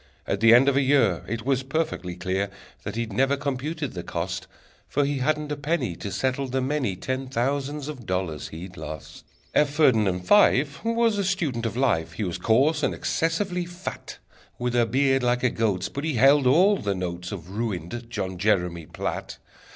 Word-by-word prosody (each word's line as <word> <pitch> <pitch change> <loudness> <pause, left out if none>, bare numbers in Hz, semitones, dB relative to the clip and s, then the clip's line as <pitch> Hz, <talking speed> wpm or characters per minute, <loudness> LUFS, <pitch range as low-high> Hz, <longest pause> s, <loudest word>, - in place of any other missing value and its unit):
At 100 - -1
the 115 +1 +6
end 125 +4 +7
of 140 - +3
a 140 - +4
year 130 - +3
It 115 +2 -4
was 135 -1 +2
perfectly 135 - -2
clear 95 +2 -1 0.3
That - - -5
he'd 115 -2 -3
never 135 +5 +2
computed 145 +1 -3
the 90 - -4
cost, 90 +2 -4 0.4
For 145 0 +1
he 140 -1 -1
hadn't 150 +2 0
a - - 0
penny 145 - -1
To 100 - -5
settle 130 +4 -1
the 130 +1 -1
many 130 -6 -1
Ten 130 +7 -3
thousands 140 +3 -2
of 130 -7 -8
dollars 90 -5 -2
he'd 90 +3 -9
lost! 75 -1 -8 0.3
F. 150 - +4
Ferdinand 110 - +3
Fife 140 - +4
Was 230 -2 +2
a - - +1
student 160 - -1
of 115 - -5
life: 85 -12 +1
He 105 - -3
was 90 -4 -3
coarse, 140 +7 +3
and - - 0
excessively 175 +2 -1
fat, 175 +1 -7 0.4
With 125 0 -2
a 120 -1 +3
beard 135 +2 +2
like 125 0 +1
a 125 - +3
goat's, 100 -5 0
But 140 - -6
he 155 -3 -1
held 135 +3 +5
all 185 +10 +5
the 100 - -2
notes 90 -1 -4
Of 90 -3 -7
ruined 110 +1 -4
John 95 -5 -4
Jeremy 90 -5 +1
Platt! - - -4
125 Hz, 190 wpm, -25 LUFS, 95-145 Hz, 0.4 s, end